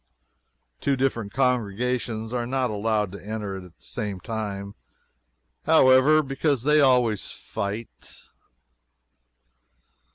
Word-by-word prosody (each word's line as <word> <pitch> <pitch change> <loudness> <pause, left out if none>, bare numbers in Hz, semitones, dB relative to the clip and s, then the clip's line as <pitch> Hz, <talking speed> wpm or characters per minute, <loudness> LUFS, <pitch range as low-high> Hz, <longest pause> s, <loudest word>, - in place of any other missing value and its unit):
Two 140 - +1
different 125 -6 -1
congregations 120 -2 -1
are 120 -1 -1
not 130 -2 0
allowed 105 -1 0
to 100 -2 -10
enter 105 -2 -4
at - - -8
the 90 - -14
same 95 - -5
time, 100 -1 -5 0.9
however, 130 +4 +6
because 135 -2 0
they 150 +1 +4
always 125 -6 +3
fight. 105 +3 -6
115 Hz, 100 wpm, -25 LUFS, 105-130 Hz, 0.9 s, however